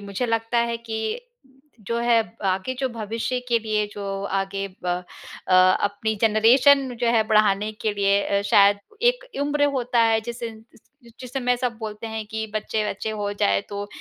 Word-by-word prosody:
मुझे 200 +4 -3
लगता 225 +1 0
है 235 0 0
कि 225 - -5 0.6
जो 235 0 0
है 235 -1 +3 0.3
आगे 190 +7 -1
जो 265 - 0
भविष्य 230 +2 -3
के 235 -1 +3
लिए 215 -1 -1
जो 195 -1 -4
आगे 195 0 -2 0.2
ब - - -3 0.6
अ, - - +1
अपनी 205 +4 +3
जनरेशन 250 +6 +5
जो 240 - +1
है 225 -2 +4
बढ़ाने 210 0 +3
के 215 -2 +1
लिए 200 0 +2 0.2
अ, 200 - -2
शायद 200 0 +5 0.2
एक - - +2 0.2
उम्र 290 0 +1
होता 245 -1 -1
है। 225 -1 +3
जिस 235 +1 -8
इन 225 -1 -7
इस - - -20 0.4
जिसे 255 +1 -5
मैं 250 0 +2
सब 245 -2 -2
बोलते 215 0 -6
हैं 220 -1 -5
कि 220 0 -3
बच्चे-वच्चे 215 0 -2
हो 205 -1 -3
जाए 100 0 +3
तो 205 0 -5
220 Hz, 175 wpm, -23 LUFS, 205-235 Hz, 0.6 s, जनरेशन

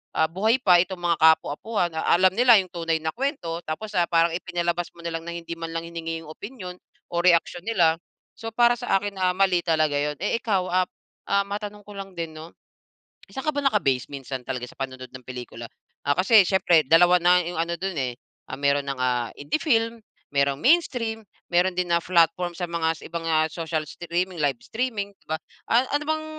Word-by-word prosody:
ah, 160 - +3
buhay 215 +7 +2
pa 180 -6 +6
itong 185 +1 -1
mga 170 -2 +2
ka-apo-apuhan, 160 +4 +2
alam 185 +3 +4
nila 245 0 +7
yung 185 - -15
tunay 165 -2 -1
na 160 - -1
kwento 235 - -3
tapos, 205 +7 -4
ah, 175 -1 +3
parang 165 0 +3
ipinalabas 175 0 -2
mo 170 - -13
na 170 - -3
lang 165 - -11
na 170 - -4
hindi 170 0 -8
man 165 0 -6
lang 165 - -2
hiningi 165 -1 -5
yung 155 - -10
opinyon 190 -2 -8 0.3
o 175 - -5
reaksyon 175 +1 +3
nila, 170 -7 +3 0.4
so 225 - -5
para 240 +1 +4
sa 245 -5 0
akin, 205 -1 -5
ah, 185 -1 +2
mali 190 -2 +3
talaga 155 -3 +2
yun. 150 +1 -1
Eh, 210 +3 0
ikaw, 200 -5 0
ah 185 0 +2 0.4
ah, 200 0 +2
matanong 205 0 -6
ko 205 - -10
lang 195 0 -7
din 165 -2 -5
'no, 160 +2 -10 0.8
saan 265 +1 -6
ka 305 - +4
ba 285 - 0
naka-base 140 - +1
minsan 135 -2 -6
talaga 125 -2 -3
sa - - -16
panonood 130 -1 -5
ng 130 -1 -11
pelikula? 120 -2 -8 0.4
Ah, 145 - +3
kasi 200 +2 +6
siyempre 175 -4 +4
dalawa 175 +3 +6
na 180 +1 +5
yung 175 - -5
ano 170 +1 -1
dun 190 -2 -3
eh, 125 -3 -2 0.3
ah, 130 - -5
meron 140 0 +2
nang, 135 -1 -3
ah, 125 -2 0
indie 145 - -2
film, 230 -5 +1 0.4
mayroong 140 0 +2
mainstream, 245 -8 +2 0.3
mayroon 180 +1 +3
din 175 -1 -1
na - - +3
platform 175 0 +2
sa 180 - -2
mga 165 -1 0
sa - - -14
ibang, 170 -1 -5
ah, 155 -1 +3
mga - - -13
social 160 -2 -2
streaming, 175 +2 -3
live 135 -4 +1
streaming 220 -4 -3
'di - - -34
ba? 160 - +1 0.3
A 240 +3 +4
ano 290 - 0
bang 315 0 -1
175 Hz, 210 wpm, -24 LUFS, 160-200 Hz, 0.8 s, nila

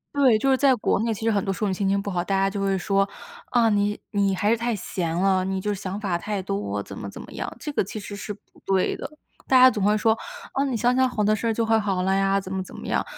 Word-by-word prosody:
对， 260 -6 +5
就 270 +5 +2
是 265 - +5
在 270 -1 +4
国 210 - 0
内， 230 0 0
其 220 +1 -4
实 225 - +3
很 200 -2 +1
多 195 - -1
时 195 - -6
候 210 - +2
你 - - 0
心 195 +1 0
情 200 0 +2
不 200 0 -4
好， 175 -1 -1
大 195 +1 -1
家 195 0 +3
就 195 0 -3
会 195 -1 +1
说， 195 +1 +1 0.4
啊， 235 -2 +3
你 205 0 +1
你 200 -2 +1
还 205 - -1
是 230 - +5
太 235 0 -1
闲 175 -4 -3
了， 185 +1 +2
你 190 0 -2
就 210 +2 -1
是 195 - -7
想 190 +2 -4
法 185 -5 -1
太 210 +1 -3
多， 100 - -3
怎 - - -10
么 100 - -6
怎 - - -10
么 - - -11
样。 - - -4
这 295 - -5
个 - - +2
其 210 +3 -6
实 205 0 -7
是 205 +1 -6
不 205 - -14
对 190 -1 +1
的， - - -6 0.4
大 260 -1 +6
家 255 0 +8
总 205 - -2
会 210 +1 +3
说： 220 +1 +3 0.4
“啊， 275 - +1
你 260 -4 -1
想 245 +2 +2
想 260 0 +3
好 215 -3 -1
的 215 +1 +3
事 230 +2 -2
儿， 225 - +2
就 230 +1 0
会 225 0 +3
好 195 -3 -1
了 190 - +2
呀。” 195 0 +2
怎 190 -1 -7
么 190 - -1
怎 185 - -10
么 - - -9
样， - - 0
200 Hz, 330 characters per minute, -24 LUFS, 190-225 Hz, 0.4 s, 家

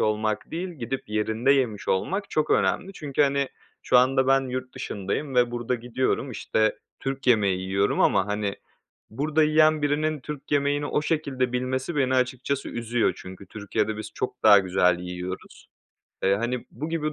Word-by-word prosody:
olmak 110 0 0
değil 175 +3 -3
gidip 135 -8 -5
yerinde 110 +5 +1
yemiş 120 -7 0
olmak 195 - -1
çok 155 -1 0
önemli 195 - +1
çünkü 145 -5 0
hani, 140 -1 +1 0.3
şu 125 - +3
anda 130 +1 +3
ben 135 0 +5
yurt 130 0 -5
dışındayım 130 +8 -4
ve 120 -1 +4
burada 120 +1 -2
gidiyorum 125 +2 -1
işte, 110 0 0 0.2
Türk 135 0 -4
yemeği 100 -6 +3
yiyorum 95 +2 0
ama 95 - +3
hani, 105 -1 -2 0.5
burada 150 +6 +1
yiyen 155 0 +4
birinin 150 +1 0
Türk 145 +1 -8
yemeğini 145 0 +1
o 150 - 0
şekilde 140 -6 -1
bilmesi 130 +5 -2
beni 130 -2 +2
açıkçası 130 +2 -1
üzüyor 120 0 0
çünkü 95 +1 -10
Türkiye'de 105 +2 -2
biz 110 0 -7
çok 125 0 -4
daha 105 -2 +8
güzel 90 -2 +2
yiyoruz. 90 +1 -7 0.5
Eee, 95 +1 +4
hani, 120 +3 -3
bu 155 - -5
gibi 155 -2 -2
125 Hz, 160 wpm, -25 LUFS, 105-145 Hz, 0.5 s, daha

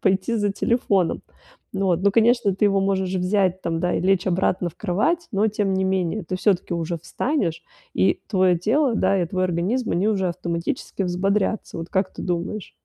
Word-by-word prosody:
пойти 190 +3 +1
за 205 -1 +1
телефоном. 200 -5 +1 0.5
Ну 195 0 0
вот. 175 -1 +1
Ну, 200 0 +3
конечно, 230 -2 +3
ты 200 +2 +2
его 200 -1 +2
можешь 190 -1 0
взять 185 0 +1
там, 165 -1 -2
да, 180 +1 0
и - - 0
лечь 190 0 +2
обратно 180 0 +1
в - - -27
кровать, 215 - 0
но 210 +3 +2
тем 200 -2 -1
не 190 - 0
менее, 190 +1 0
ты 185 +2 -3
всё-таки 185 -2 +1
уже 170 0 -2
встанешь, 180 - -2 0.3
и 190 - +2
твоё 185 -3 +3
тело, 245 - +2
да, 195 -3 +2
и 175 - 0
твой 185 +2 -2
организм 185 +8 -1
они 185 +4 +1
уже 190 -4 +1
автоматически 170 +2 -3
взбодрятся, 195 +2 -1
вот 165 +1 -6
как 190 0 0
ты - - -7
думаешь? 180 +3 -3
190 Hz, 190 wpm, -23 LUFS, 180-205 Hz, 0.5 s, Ну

